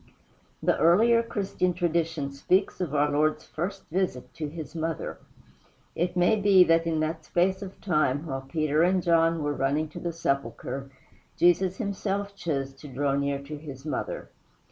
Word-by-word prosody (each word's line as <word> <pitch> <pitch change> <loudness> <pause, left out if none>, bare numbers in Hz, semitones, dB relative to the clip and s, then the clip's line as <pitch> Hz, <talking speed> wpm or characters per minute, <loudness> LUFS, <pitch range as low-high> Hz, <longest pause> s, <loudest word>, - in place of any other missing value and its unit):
The - - +2
earlier 225 +8 +5
Christian 195 -5 -1
tradition 165 -4 0
speaks 185 +8 +1
of 155 -5 -2
our 145 0 +3
Lord's 155 +1 +1
first 190 +5 -5
visit 180 -8 -2
to 155 - -4
his 155 -1 -8
mother. 165 -1 -3 0.8
It 175 +2 -1
may 180 +5 +4
be 195 -2 +7
that 165 -1 +3
in 160 -1 0
that 160 +1 -2
space 185 +4 +1
of 195 -1 -8
time 150 -5 +1
while 135 -4 -3
Peter 155 +2 0
and 180 +1 +3
John 165 -1 +3
were 145 0 0
running 145 +3 0
to - - -8
the 170 - -3
sepulchre 140 -3 -3 0.5
Jesus 180 +2 +3
himself 200 -1 -2
chose 140 -7 -2
to 145 - -11
draw 140 +1 -1
near 140 0 -1
to 150 +2 -7
his 140 -2 -9
mother. 155 - -4
165 Hz, 165 wpm, -27 LUFS, 145-180 Hz, 0.8 s, be